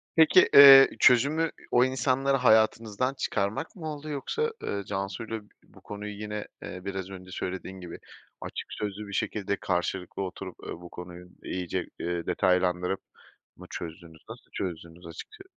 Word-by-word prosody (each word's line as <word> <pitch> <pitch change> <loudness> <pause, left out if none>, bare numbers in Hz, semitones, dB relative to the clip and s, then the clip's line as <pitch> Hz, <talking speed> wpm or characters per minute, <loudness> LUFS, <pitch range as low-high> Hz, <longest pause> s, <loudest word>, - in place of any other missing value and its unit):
Peki, 160 +3 +6
eee, 135 -1 +11
çözümü, 145 +7 +4 0.2
o 120 - +5
insanları 135 +1 +1
hayatınızdan 110 +1 +2
çıkarmak 105 +2 -2
mı 160 -5 -7
oldu, 150 +1 -8
yoksa, 450 - -2
ııı, 100 0 -3
Cansu’yla 100 +4 -4 0.2
bu - - -20
konuyu 105 0 -7
yine, 105 0 -5 0.2
eee, 90 - -7
biraz 95 -1 -4
önce 95 -1 -10
söylediğin 95 +1 -5
gibi, 90 -2 -9 0.4
açık - - -6
sözlü 105 0 -5
bir 100 - -9
şekilde 100 0 -1
karşılıklı 90 +1 -2
oturup, 95 -1 -7
eee, - - -7
bu 85 +1 -11
konuyu 90 0 -10 0.2
iyice, 90 0 -3
eee, 85 0 -3
detaylandırıp 90 0 +1 0.6
mı 90 - -12
çözdünüz? 80 -1 -9
Nasıl - - -12
çözdünüz, 85 -1 -6
açıkça 385 - -11
100 Hz, 145 wpm, -27 LUFS, 90-130 Hz, 0.6 s, eee